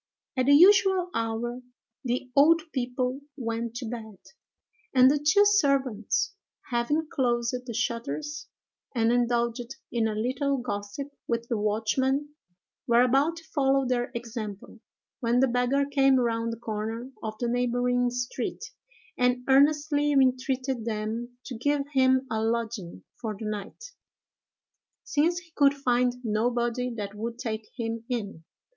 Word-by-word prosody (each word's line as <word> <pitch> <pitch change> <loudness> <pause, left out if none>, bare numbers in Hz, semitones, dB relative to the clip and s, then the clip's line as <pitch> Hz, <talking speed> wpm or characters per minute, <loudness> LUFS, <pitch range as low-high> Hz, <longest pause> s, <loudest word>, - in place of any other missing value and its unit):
At 255 -1 +1
the 285 - +7
usual 380 +1 +5
hour 230 +2 -2 0.4
the 250 0 -2
old 320 +4 +6
people 250 +1 -2 0.2
went 230 -2 -3
to 250 0 -4
bed; 220 -3 -7 0.8
and 255 +1 +7
the 295 - +1
two 315 +8 +4
servants, 265 - +2 0.4
having 295 +7 0
closed 240 -5 0
the 235 - -4
shutters, 280 +6 -3 0.5
and 230 -1 +3
indulged 240 0 0 0.2
in 230 -2 +1
a 215 - -2
little 265 +5 0
gossip 220 +3 -5 0.2
with 235 0 -1
the 230 - 0
watchman, 260 +7 0 0.6
were 240 0 +5
about 275 +6 +2
to 330 - -11
follow 275 -2 +2
their 245 -1 0
example, 220 -4 -6 0.4
when 240 -1 +2
the 265 - +4
beggar 250 +3 +1
came 270 -1 +3
round 230 -2 0
the 230 - -5
corner 225 +3 -4
of 215 -1 -5
the 240 - -1
neighboring 245 0 +1
street, 245 +1 -4 0.5
and 250 0 +2
earnestly 290 +2 +3
entreated 260 -2 +1
them 225 +2 -4
to 255 - -6
give 285 +5 0
him 260 0 +4
a 220 - 0
lodging 225 - -3 0.2
for 220 -3 -3
the 220 - -5
night, 215 - -6 1.1
since 320 +4 +1
he 350 -1 -9
could 285 -1 +4
find 250 -2 +1
nobody 240 +2 0
that 205 -3 -5
would 230 +3 -5
take 220 -2 -4
him 230 -1 -3
in. 205 -9 -4
245 Hz, 140 wpm, -27 LUFS, 230-275 Hz, 1.1 s, the